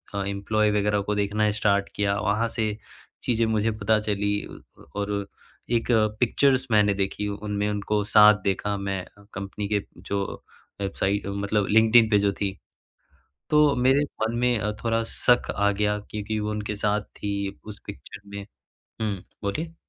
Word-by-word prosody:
अ, 100 - -1
employee 105 +2 +1
वग़ैरह 105 0 +1
को 105 - 0
देखना 105 +1 +1
स्टार्ट 100 -1 +1
किया, 100 -1 +1
वहाँ 105 +2 +1
से 110 -2 -2 0.5
चीज़ें 115 -2 +1
मुझे 110 0 +1
पता 110 0 +1
चली 105 -1 -1 0.6
और 100 0 -2 0.7
एक 115 - -4 0.3
पिक्चर्स 130 +2 +3
मैंने 105 -2 +4
देखी 100 +1 -2
उनमें 105 0 -2
उनको 105 0 -1
साथ 105 -1 +7
देखा 100 +1 0
मैं 100 -1 -3 0.3
कंपनी 100 +1 -5
के 100 - +2 0.2
जो 100 0 -2 0.6
वेबसाइट 100 0 -1
मतलब 100 0 0
लिंक्ड-इन 110 +1 +6
पे 105 -2 +4
जो 100 0 +2
थी 100 -1 +1 1.0
तो 150 -2 +5
मेरे 130 +3 +3 0.2
मन 110 +1 0
में 110 -4 +1
थोड़ा 115 0 +1
शक 125 -1 +2
आ 100 0 +3
गया 105 +1 0
क्योंकि 105 +1 -4
वो 105 0 -2
उनके 105 0 -3
साथ 105 +1 0
थी, 100 -1 -5
उस 105 -1 -9
पिक्चर - - -9
में 100 0 -6 0.6
हुँ, 105 -4 -2 0.2
बोलिए? 160 +12 -3
105 Hz, 150 wpm, -25 LUFS, 100-110 Hz, 1.0 s, साथ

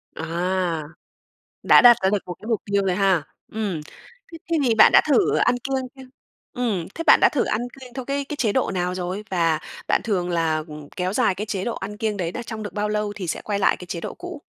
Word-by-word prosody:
À. 170 0 -1 0.8
Đã - - +7
đặt 240 -2 +8
ra 190 - +4
được 205 - +2
một 180 - -5
cái 215 - -9
mục 225 -4 0
tiêu 200 0 +1
rồi 180 -1 +1
ha. 190 -5 +2 0.3
Ừm. 205 -8 -3 0.5
Thế 330 0 -3
thì 230 -3 +2
bạn 220 - +7
đã - - +7
thử 255 - +3
ăn 245 - +3
kiêng 265 0 -3
chưa? 265 - -12 0.5
Ừm, 220 -9 -2
thế 330 - -3
bạn - - +8
đã - - +7
thử - - 0
ăn 225 - -1 0.2
kiêng 250 -2 -12
theo 260 -1 -6
cái 280 0 -2
cái 295 - -5
chế 220 -6 +1
độ 260 - +1
nào 180 -1 -1
rồi? 185 +3 -4
Và 165 -4 +1 0.3
bạn - - +2
thường 180 -5 -1
là, 160 -2 0
ừm, 150 -1 -10
kéo 185 +1 -2
dài 220 -6 +2
cái 210 - -4
chế 195 -3 -3
độ 235 - -2
ăn 205 +2 -6
kiêng 215 -2 -2
đấy 170 -2 -2
đó 240 - -5
trong 220 -2 -6
được 205 - -7
bao 210 0 -1
lâu 210 -1 -1
thì 185 -4 -5
sẽ - - -3
quay 205 -2 -2
lại - - +3
cái 180 - -10
chế 170 -1 -5
độ - - -5
cũ? 355 -4 -9
205 Hz, 250 wpm, -23 LUFS, 180-235 Hz, 0.8 s, đặt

